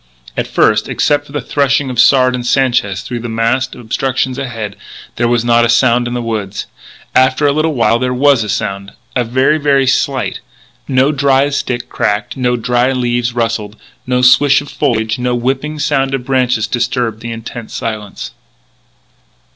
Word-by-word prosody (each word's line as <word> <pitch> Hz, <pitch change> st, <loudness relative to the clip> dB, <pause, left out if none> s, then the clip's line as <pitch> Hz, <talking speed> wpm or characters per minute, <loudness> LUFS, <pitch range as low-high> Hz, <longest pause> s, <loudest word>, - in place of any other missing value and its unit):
At -, -, -2 dB
first, 110 Hz, 0 st, +2 dB
except 145 Hz, 0 st, +1 dB
for -, -, -14 dB
the 145 Hz, -, -3 dB
threshing 140 Hz, -1 st, 0 dB
of 125 Hz, -, -4 dB
Sard 130 Hz, -1 st, +5 dB
and 125 Hz, -1 st, -3 dB
Sanchez 120 Hz, -7 st, +1 dB
through 120 Hz, -1 st, -5 dB
the 120 Hz, 0 st, -6 dB
massed 115 Hz, +3 st, 0 dB
obstructions 130 Hz, +2 st, -2 dB
ahead, 115 Hz, -6 st, -5 dB, 0.4 s
there 120 Hz, -, +1 dB
was 120 Hz, -1 st, +1 dB
not 120 Hz, 0 st, +4 dB
a 120 Hz, -, +1 dB
sound 120 Hz, 0 st, +3 dB
in 120 Hz, -, -4 dB
the 120 Hz, -, -2 dB
woods. 105 Hz, -4 st, -4 dB, 0.5 s
After 130 Hz, +3 st, +3 dB
a 145 Hz, -, +4 dB
little 155 Hz, +1 st, 0 dB
while 115 Hz, -1 st, +2 dB
there 125 Hz, 0 st, -1 dB
was 130 Hz, -1 st, +3 dB
a 105 Hz, -, -6 dB
sound 100 Hz, -1 st, -3 dB, 0.2 s
very, 130 Hz, +5 st, +1 dB
very 140 Hz, -2 st, +2 dB
slight. 130 Hz, 0 st, 0 dB, 0.5 s
No 135 Hz, +1 st, +2 dB
dry 140 Hz, -1 st, +2 dB
stick 125 Hz, -3 st, -3 dB
cracked; 105 Hz, 0 st, -2 dB
no 125 Hz, -2 st, 0 dB
dry 120 Hz, +2 st, +1 dB
leaves 120 Hz, -1 st, -1 dB
rustled; 115 Hz, -3 st, -2 dB, 0.3 s
no 125 Hz, 0 st, +1 dB
swish 140 Hz, +3 st, +5 dB
of 145 Hz, -, -9 dB
foliage; 110 Hz, -5 st, -1 dB
no 125 Hz, 0 st, 0 dB
whipping 135 Hz, +5 st, -2 dB
sound 135 Hz, -2 st, 0 dB
of 125 Hz, -2 st, -6 dB
branches 125 Hz, -4 st, +1 dB
disturbed 120 Hz, -2 st, -1 dB
the 115 Hz, +1 st, -6 dB
intense 115 Hz, 0 st, -8 dB
silence. 105 Hz, -3 st, -5 dB
125 Hz, 170 wpm, -14 LUFS, 115-135 Hz, 0.5 s, Sard